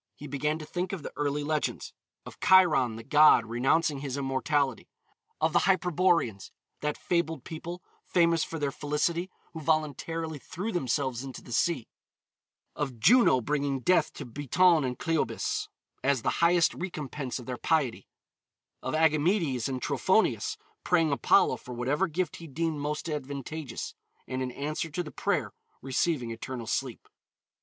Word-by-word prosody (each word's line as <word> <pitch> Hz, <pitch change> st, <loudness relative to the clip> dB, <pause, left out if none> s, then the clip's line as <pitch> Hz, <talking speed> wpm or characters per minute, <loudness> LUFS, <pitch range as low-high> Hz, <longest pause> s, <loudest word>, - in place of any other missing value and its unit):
He 150 Hz, -, -10 dB
began 150 Hz, +2 st, -1 dB
to 155 Hz, -, -8 dB
think 180 Hz, +4 st, -3 dB
of 180 Hz, -6 st, -5 dB
the -, -, -7 dB
early 145 Hz, 0 st, -1 dB
legends: 155 Hz, 0 st, -2 dB, 0.3 s
of -, -, -11 dB
Chiron, 160 Hz, -11 st, +5 dB
the 115 Hz, -, -8 dB
god, 150 Hz, -3 st, +6 dB
renouncing 135 Hz, +6 st, +1 dB
his 135 Hz, -1 st, -4 dB
immortality; 135 Hz, -1 st, 0 dB, 0.5 s
of 160 Hz, 0 st, +1 dB
the -, -, +3 dB
Hyperboreans, 175 Hz, -, +2 dB, 0.3 s
that 150 Hz, 0 st, -2 dB
fabled 170 Hz, -2 st, -1 dB
people, 170 Hz, +2 st, -7 dB, 0.2 s
famous 170 Hz, -2 st, +3 dB
for 165 Hz, -, -5 dB
their 145 Hz, -2 st, -1 dB
felicity, 155 Hz, +6 st, -1 dB, 0.2 s
who 160 Hz, -, -6 dB
voluntarily 155 Hz, +1 st, -1 dB
threw 185 Hz, -, -5 dB
themselves 130 Hz, -, -1 dB
into 135 Hz, -2 st, -8 dB
the -, -, -12 dB
sea; 125 Hz, +1 st, +1 dB, 0.9 s
of 135 Hz, -5 st, -3 dB
Juno 220 Hz, -, +5 dB
bringing 140 Hz, +1 st, -1 dB
death 170 Hz, +3 st, +3 dB
to 145 Hz, -, -7 dB
Biton 150 Hz, +6 st, +3 dB
and 125 Hz, -, -4 dB
Cleobis 165 Hz, -1 st, -1 dB, 0.4 s
as 135 Hz, -3 st, +2 dB
the -, -, +2 dB
highest 170 Hz, -1 st, +4 dB
recompense 150 Hz, -7 st, -5 dB
of 125 Hz, -, -9 dB
their 125 Hz, 0 st, -4 dB
piety; 145 Hz, -7 st, 0 dB, 0.7 s
of 130 Hz, -, -2 dB
Agamedes 155 Hz, -, +2 dB
and 130 Hz, -1 st, -2 dB
Trophonius, 190 Hz, -, +1 dB, 0.3 s
praying 165 Hz, -4 st, +3 dB
Apollo 140 Hz, -, +4 dB
for 125 Hz, -, -9 dB
whatever 140 Hz, +10 st, 0 dB
gift 180 Hz, +2 st, -2 dB
he 165 Hz, -, -9 dB
deemed 160 Hz, +1 st, -2 dB
most 150 Hz, +3 st, -3 dB
advantageous, 145 Hz, -2 st, -5 dB, 0.3 s
and 130 Hz, 0 st, -3 dB
in 130 Hz, -1 st, -2 dB
answer 155 Hz, +4 st, -3 dB
to 175 Hz, +4 st, -3 dB
the 150 Hz, -, -9 dB
prayer -, -, -1 dB, 0.3 s
receiving 135 Hz, -2 st, 0 dB
eternal 115 Hz, +1 st, -6 dB
sleep. 125 Hz, +2 st, -3 dB
150 Hz, 150 wpm, -28 LUFS, 135-165 Hz, 0.9 s, god